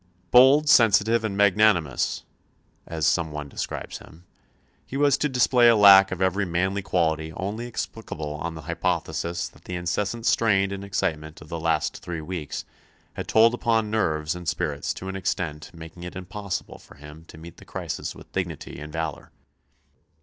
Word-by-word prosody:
"Bold, 135 +5 +6
sensitive, 115 -2 +5
and 100 -3 -3
magnanimous," 100 - +2 0.6
as 80 -3 -2
some 80 0 +1
one 75 -1 -6
describes - - -5
him, 85 +3 -16 0.6
he 135 - -6
was 145 -1 +4
to 150 - +1
display 125 -2 +4
a 115 - +6
lack 100 -2 +8
of 95 0 -1
every 95 +2 +1
manly 95 +3 -1
quality 80 -4 0
only 105 +7 -4
explicable 80 -10 -5
on 80 +2 -5
the 80 - -9
hypothesis 85 +1 -2
that - - -22
the 90 - -5
incessant 100 +6 -2
strain 100 -5 +2
and 100 0 -5
excitement 80 -6 -3
of 75 - -14
the 85 - -4
last 80 -2 0
three 85 -2 -6
weeks 80 -2 -5 0.5
had - - -6
told 115 +1 +5
upon 115 -3 0
nerves 80 -8 0
and 90 -1 -4
spirits 75 -5 -2
to 95 - -8
an 95 - -5
extent 85 -5 -3
making 85 +1 -11
it 90 0 -8
impossible 95 +1 -6
for - - -17
him 75 +2 -13
to - - -13
meet 85 +1 -12
the - - -14
crisis - - -5
with - - -15
dignity 85 -5 -5
and 75 +1 -8
valour. 80 0 -4
90 Hz, 170 wpm, -25 LUFS, 80-105 Hz, 0.6 s, lack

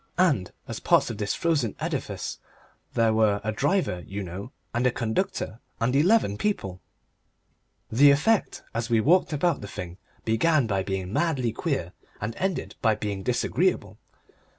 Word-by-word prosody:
And 150 - +2 0.2
as - - -5
parts - - +3
of 110 - -7
this 105 -1 -1
frozen 145 -10 0
edifice - - -3 0.6
there 115 -1 +3
were 110 -2 +3
a 110 - 0
driver, 140 - 0
you 100 +1 -4
know, 95 +3 -7 0.2
and 120 +2 +2
a - - +3
conductor, 120 - -2 0.2
and 120 +3 +1
eleven 150 - +3
people! 95 - -2 1.1
The 140 +6 +7
effect 170 +10 +2
as 115 0 -2
we 115 -1 +4
walked 170 +11 +4
about 165 +4 +1
the 105 - -6
thing 90 -2 -7 0.3
began 140 +6 +3
by 100 -3 0
being 95 0 -3
madly 130 -9 +1
queer, - - -2 0.3
and 110 +3 -4
ended 180 - -2
by 110 -1 +3
being 105 -2 -3
disagreeable. - - 0
115 Hz, 150 wpm, -26 LUFS, 100-155 Hz, 1.1 s, The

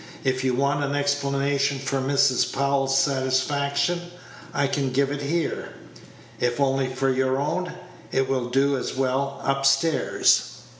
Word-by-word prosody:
"If 130 -1 0
you 130 -1 +1
want 140 +2 +1
an 140 0 -1
explanation 140 0 0
for 135 0 -2
Mrs. 135 -1 +2
Powell's 135 0 +1
satisfaction, 140 +5 0 0.4
I 140 - +1
can 140 -1 -1
give 135 +2 +1
it 145 0 -3
here; 160 +4 -2 0.7
if 125 +1 0
only 135 -1 +1
for 130 +1 0
your 130 +1 +1
own, 180 +6 -2 0.4
it 135 0 +1
will 130 -2 -1
do 135 +2 +2
as - - -4
well 135 +1 -1
up 135 0 0
stairs." 135 - +2
135 Hz, 145 wpm, -24 LUFS, 130-140 Hz, 0.7 s, Mrs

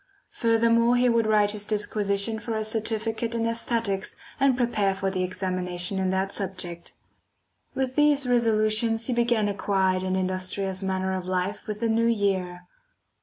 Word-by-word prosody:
Furthermore 230 +1 +3
he 245 0 +3
would 230 -2 +2
write 210 -1 +4
his 210 -1 -3
disquisition 210 0 0
for 230 0 -4
a 220 - -1
certificate 220 +1 -1
in 230 - -1
æsthetics 230 -3 -1 0.2
and 270 -2 +3
prepare 210 -6 +1
for 195 0 -2
the 185 -1 -2
examination 185 0 -2
in 190 -1 0
that 190 +1 -1
subject. 175 -4 -3 0.8
With 260 -1 -2
these 295 -2 +3
resolutions 225 -1 +2
he 255 - 0
began 235 -3 +1
a 205 - -1
quiet 190 -2 0
and 185 0 -1
industrious 185 +1 -2
manner 190 0 -1
of 185 -1 -4
life 185 +4 -2
with 210 0 -5
the 230 - +1
new 230 +1 +2
year. 190 -5 -1
210 Hz, 160 wpm, -25 LUFS, 190-230 Hz, 0.8 s, write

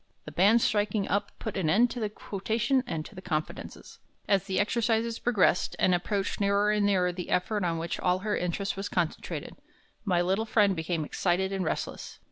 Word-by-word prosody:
The 150 - -8
band 200 +9 +4
striking 205 -1 +1
up 200 - 0
put 220 - -5
an 180 -5 0
end 230 +8 +4
to 245 - -5
the 215 -2 -1
quotation 225 +6 -1
and 155 -8 -3
to - - -11
the 185 - -9
confidences. 155 -4 -5 0.3
As 195 -2 +2
the 190 -1 -1
exercises 225 +1 +1
progressed 220 -6 +2
and 185 - +3
approached 195 +3 -1
nearer 200 +1 +3
and 210 -1 +2
nearer 180 -3 +2
the 180 0 -6
effort 205 +3 0
on 170 -2 0
which 165 +1 -3
all 180 0 +2
her 210 - +1
interest 180 +3 -2
was 195 +1 -4
concentrated, 170 -3 -3 0.5
my 185 -5 +1
little 190 +5 +1
friend 205 -3 +3
became 160 -1 -2
excited 190 +4 0
and 190 -1 -1
restless. 160 - -4
195 Hz, 190 wpm, -28 LUFS, 180-210 Hz, 0.5 s, band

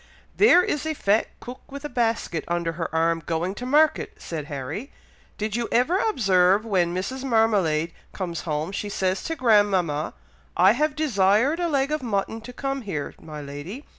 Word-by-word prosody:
"There 360 -4 +6
is 295 +1 -2
a 315 - -1
fat 210 -3 +2
cook 250 +3 -11
with 280 +1 -7
a - - -1
basket 225 - -1
under 170 -1 -1
her 165 0 -4
arm, 165 +1 +1
going 170 +4 -2
to 250 +4 -6
market," 300 +3 +3
said 155 -3 -6
Harry. 145 - -6 0.5
"Did 215 0 -2
you 235 -1 -1
ever 280 +11 +3
observe 195 - +3
when 180 -6 +1
Mrs. 195 +9 -4
Marmalade 200 -10 +2 0.2
comes 175 -4 -4
home, 155 +1 -2
she 205 +1 -4
says 190 -1 -1
to 325 - -2
grandmama, 200 - +2 0.4
'I 185 +2 +7
have 295 +6 0
desired 250 - +2
a 345 -1 0
leg 280 -1 +1
of 305 - -1
mutton 225 -1 -2
to 240 +3 -9
come 275 +1 -3
here, 170 - -4
my 150 -1 -8
lady! 145 - -8
205 Hz, 175 wpm, -24 LUFS, 170-260 Hz, 0.5 s, I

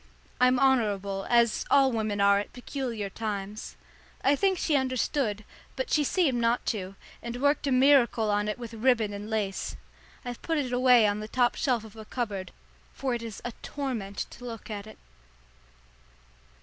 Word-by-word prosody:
I'm 250 0 +5
honourable, 205 -7 +1
as 235 -2 +3
all 275 -1 +5
women 215 -3 -1
are 200 0 +5
at 205 - -6
peculiar 245 -4 -4
times. 205 0 -5 0.5
I 280 - +4
think 380 +4 +2
she 315 -3 +1
understood, 255 -4 0 0.3
but - - -3
she 300 - +3
seemed 285 -5 +1
not 235 +1 +1
to, 195 -2 -6 0.3
and 235 +1 -5
worked 285 +1 +2
a - - +1
miracle 255 -4 +4
on 205 0 +1
it 210 - -2
with 235 -2 -8
ribbon 225 -2 +2
and 205 +1 -6
lace. 210 -3 -2 0.5
I've 245 -1 -6
put 325 -1 -1
it 260 -4 -2
away 250 -2 +6
on 205 0 +1
the 215 - -5
top 245 +1 +2
shelf 250 -7 0
of 220 -1 -13
a 220 - -9
cupboard, 210 -6 -4 0.4
for 265 -2 -1
it 240 - -2
is 225 -3 -8
a 240 - -2
torment 235 -9 -4
to 245 - -12
look 230 -2 -7
at 205 0 -5
it. 215 - -12
235 Hz, 175 wpm, -28 LUFS, 210-260 Hz, 0.5 s, away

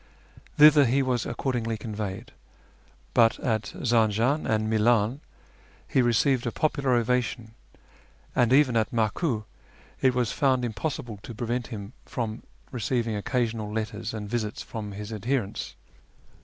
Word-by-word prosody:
Thither 150 -1 +8
he 135 +3 +2
was 125 -3 0
accordingly 115 -4 -2
conveyed; 105 +2 -5 0.8
but 115 -1 +4
at 110 -4 -1 0.2
Zanjan 115 +4 +2
and 110 0 +1
Milan 110 +3 +2 0.7
he 130 - +2
received 120 +1 +2
a - - -1
popular 140 -3 +1
ovation, 120 -1 0 0.8
and 120 -1 +3
even 130 -3 +5
at 110 -1 +2
Maku 115 - 0 0.6
it 130 -2 +3
was 125 -3 +1
found 130 -3 +2
impossible 120 -2 -4
to 115 - -9
prevent 120 +2 -2
him 105 -2 -7
from 115 -2 -4 0.3
receiving 120 -2 -1
occasional 110 -1 -1
letters 110 0 -3
and 105 -2 -5
visits 110 -1 -3
from 105 -3 -6
his 105 +2 -6
adherents. 110 0 -2
115 Hz, 130 wpm, -26 LUFS, 110-125 Hz, 0.8 s, Thither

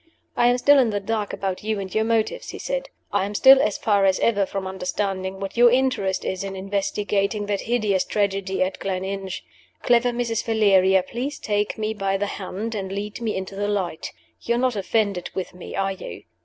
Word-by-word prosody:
"I 240 - +4
am 245 0 +4
still 285 +3 +6
in 250 -4 +3
the 205 -1 -1
dark 210 0 -2
about 190 -1 -3
you 215 -1 -1
and 190 -1 -6
your 220 - +2
motives," 230 - 0
he - - -6
said. - - -3 0.2
"I - - +2
am 205 +1 -4
still 265 +4 +8
as 210 - 0
far 205 -3 +2
as 190 -1 +3
ever 200 -4 +2
from 195 -1 -4
understanding 190 0 -3
what 195 0 -5
your 240 0 +7
interest 245 -7 +1
is 190 0 -2
in 195 -1 -5
investigating 200 +1 -1
that 205 -1 -1
hideous 215 -5 +1
tragedy 195 -2 0
at 185 +1 -3
Gleninch. 190 0 -4 0.4
Clever 245 0 +4
Mrs. 235 -2 -1
Valeria, 195 -4 +4
please 255 +9 -4
take 205 0 -1
me 215 0 -1
by 195 -2 -1
the 205 - -1
hand, 205 +3 -5
and 195 -3 -4
lead 205 +3 -5
me 225 -2 -1
into 190 +1 -5
the 205 +1 -1
light. 185 -6 -2 0.3
You're 235 0 0
not 250 -1 +1
offended 200 -2 0
with 190 -1 -4
me 180 - -9
are 195 0 0
you? 185 - -8
205 Hz, 200 wpm, -23 LUFS, 190-225 Hz, 0.4 s, still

